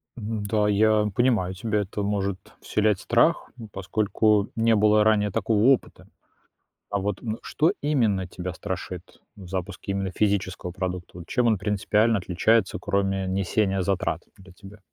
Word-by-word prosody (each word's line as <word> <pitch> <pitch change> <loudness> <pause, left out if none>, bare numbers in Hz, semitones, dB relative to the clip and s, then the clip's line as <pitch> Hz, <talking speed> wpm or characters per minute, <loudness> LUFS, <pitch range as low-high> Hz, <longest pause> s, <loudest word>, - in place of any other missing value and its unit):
М, 110 -2 -4
да, 105 0 +1
я 105 +1 +3
понимаю 110 -7 +2
тебя, 105 +2 -1
это 100 +1 -4
может 100 -2 -1 0.2
вселять 105 -2 +1
страх, - - +2
ну, 115 -2 -9
поскольку 105 +1 +1
не 115 0 +3
было 105 0 +4
ранее 105 -2 +2
такого 110 0 +1
опыта. 135 -1 +1 0.8
А 100 - 0
вот, 100 0 -3
м, 110 -1 -3
что 160 +4 +1
именно 110 -11 +1
тебя 90 0 -6
страшит 90 -2 -7 0.2
в 95 -3 -11
запуске 95 +2 -4
именно 95 -1 -2
физического 95 -3 -1
продукта? 90 -1 -5
Вот 85 - -10
чем 125 -3 +1
он 110 -3 +3
принципиально 105 +3 +1
отличается, 95 +3 +1
кроме 95 -1 0
несения 95 +1 0
затрат 95 -1 -1 0.2
для 95 -1 -15
тебя? 100 +3 -14
100 Hz, 155 wpm, -25 LUFS, 95-110 Hz, 0.8 s, было